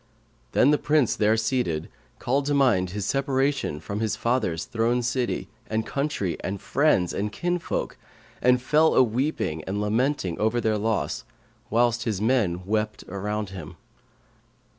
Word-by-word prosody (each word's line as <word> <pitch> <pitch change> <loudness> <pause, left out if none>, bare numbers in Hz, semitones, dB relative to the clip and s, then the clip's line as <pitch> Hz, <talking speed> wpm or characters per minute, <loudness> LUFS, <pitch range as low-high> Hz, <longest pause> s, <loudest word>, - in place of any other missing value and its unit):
Then 140 - +5
the 150 - +3
Prince, 150 -4 +2
there 110 +1 +3
seated, 110 - 0 0.3
called 135 +3 0
to 145 - +2
mind 110 -10 +3
his 100 +1 -4
separation 135 - 0
from 100 +6 -5
his 110 -1 0
father's 110 -6 0
throne 120 0 0
city[FN#540] 120 +1 -1 0.2
and 110 0 -1
country 140 - -2
and 100 +1 -4
friends 130 - +2
and 105 +1 -2
kinsfolk; 175 +6 -2 0.4
and 125 0 +4
fell 150 +5 +3
a - - +7
weeping 120 - -1
and 100 +2 -2
lamenting 105 - 0
over 110 +3 +1
their 110 -2 +1
loss 110 0 -1 0.5
whilst 120 +1 +2
his 110 -5 -1
men 105 -6 +1
wept 105 +1 -1
around 105 +1 -3
him. 85 -6 -8
110 Hz, 145 wpm, -25 LUFS, 100-130 Hz, 0.5 s, a